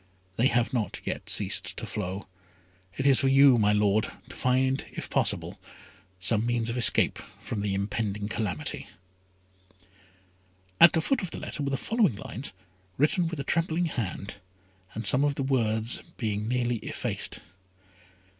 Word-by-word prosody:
They 120 +6 +3
have 120 -1 +1
not 115 -5 -2
yet - - -4
ceased - - +1
to - - -3
flow. 95 -1 -5 0.7
It 135 - -2
is 135 -2 +7
for 135 - +2
you, 135 -2 +6
my 105 -1 +3
Lord, 105 0 +2 0.2
to - - -10
find, 130 +1 +1
if - - -6
possible, - - 0 0.6
some 110 +3 +1
means 120 -1 0
of - - -4
escape 120 - +4 0.2
from 100 - -5
the 100 -1 -1
impending 100 +1 -2
calamity." 105 -8 -3 1.9
At 170 - +9
the 160 - +2
foot 270 - 0
of 185 - -4
the - - -7
letter - - -3
were 140 - -1
the 135 - -1
following 220 - +1
lines, 110 +3 -4 0.5
written 160 +5 +2
with 165 -2 -5
a - - -2
trembling 165 +2 0
hand, 105 - -4 0.6
and 110 - -4
some 130 +2 +4
of 145 -1 +1
the 135 - -2
words 115 -3 0 0.2
being 105 -3 -2
nearly 120 0 0
effaced. - - -4
120 Hz, 155 wpm, -27 LUFS, 105-140 Hz, 1.9 s, At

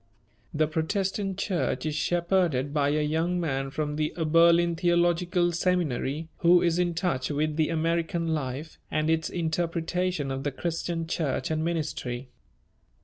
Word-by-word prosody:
The 155 0 +2
Protestant 190 +5 -1
church 190 -5 -1
is 155 - -1
shepherded 170 -4 +1
by 145 -2 +2
a 150 +1 +1
young 165 +4 0
man 135 -5 -1
from 150 +1 -3
the 155 0 -1
Oberlin 170 +1 +4
Theological 175 +1 +2
Seminary, 165 -4 0
who 175 0 +5
is 170 0 +2
in 175 -1 +1
touch 165 -8 -1
with 150 +1 0
the 155 -1 +1
American 165 +1 0
life 150 0 -3
and 155 +1 +1
its 160 0 0
interpretation 170 -1 -1
of 135 0 -3
the 145 - -1
Christian 165 +2 -3
Church 155 -4 -2
and 155 0 0
ministry. 150 -6 -3
165 Hz, 145 wpm, -27 LUFS, 150-175 Hz, -, who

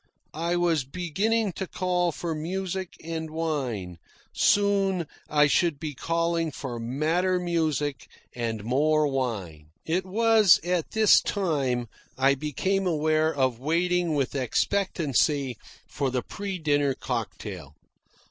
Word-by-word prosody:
I 170 +3 -1
was 170 -5 +2
beginning 190 - -1
to 190 - -4
call 180 -1 0
for 165 +1 -4
music 185 +3 -4
and 160 -1 -4
wine; 130 - -3 0.3
soon 195 -3 +2 0.2
I 150 -1 +5
should 150 0 +2
be 155 -2 -4
calling 165 +3 0
for 125 -4 -6
madder 160 +10 0
music 155 -5 -1 0.3
and 115 -3 -3
more 150 +6 +2
wine. 105 - -3 0.2
It 175 +4 0
was 215 0 +5
at 175 -2 -1
this 220 -1 +6
time 140 - -1 0.3
I 135 +1 +4
became 185 +7 -1
aware 155 -1 +2
of 130 -5 0
waiting 170 +3 +1
with 140 -3 0
expectancy 145 - 0 0.3
for 140 -2 -2
the 125 -1 -2
pre 200 -2 -5
dinner 145 -4 +1
cocktail. 105 - -5
155 Hz, 120 wpm, -26 LUFS, 135-180 Hz, 0.3 s, this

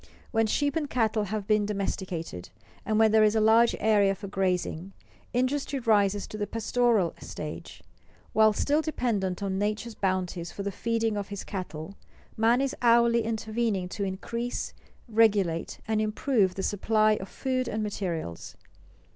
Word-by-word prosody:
When 225 -2 +2
sheep 285 +5 0
and 305 -3 -1
cattle 220 -3 +1
have 210 0 -3
been 215 0 +3
domesticated, 185 - -4 0.4
and 215 -1 +1
where 220 0 +6
there 220 0 +5
is 215 0 +3
a - - +4
large 225 +2 +5
area 205 -3 +3
for 200 - -9
grazing, 185 -1 -1 0.4
industry 270 +3 0
rises 205 -5 +2
to 215 - -7
the 205 - -1
pastoral 230 -4 +1
stage. - - -8 0.5
While 220 0 +6
still 290 +8 +1
dependent 210 - -1
on 190 -1 -1
nature's 215 +3 -2
bounties 185 -3 -2
for 200 - -6
the 200 - -2
feeding 225 0 -1
of 200 -1 -3
his 200 -1 -6
cattle, 180 -3 -6 0.4
man 230 +3 +3
is 275 +1 -1
hourly 235 -1 +5
intervening 220 -3 -1
to 200 - -4
increase, 230 +5 -3 0.3
regulate, 205 -7 +2
and 220 -1 +1
improve 215 -2 +1
the 190 - -3
supply 215 +2 +2
of 190 - -7
food 255 -2 -2
and 215 -1 -2
materials. 170 - -4
215 Hz, 155 wpm, -27 LUFS, 195-230 Hz, 0.5 s, where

